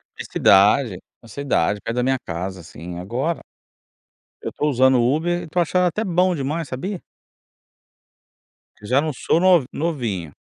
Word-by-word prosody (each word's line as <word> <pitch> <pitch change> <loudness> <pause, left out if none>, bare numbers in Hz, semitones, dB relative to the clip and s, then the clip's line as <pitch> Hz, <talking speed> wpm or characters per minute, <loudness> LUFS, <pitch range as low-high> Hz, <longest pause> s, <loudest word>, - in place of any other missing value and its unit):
Na - - -7
cidade 100 +2 +4 0.2
na 115 - -16
cidade, 105 -6 -1
perto 115 - -3
da 125 - 0
minha 130 0 +1
casa, 90 +2 -5
assim. 85 +2 -9
Agora, 130 - -3 1.0
eu - - -4
estou 150 - -2
usando 130 -1 +4
Uber 160 +8 +1
e - - -8
estou 175 +2 -1
achando 180 +2 +1
até 195 +5 -1
bom 180 -1 +1
demais, 150 +2 -3
sabia? 180 +9 -5 1.8
Porque 105 - -16
já 130 +6 +2
não 155 0 -2
sou 160 - +1
nov 180 -7 +4
novinho... 115 - -3
135 Hz, 155 wpm, -21 LUFS, 105-170 Hz, 1.8 s, cidade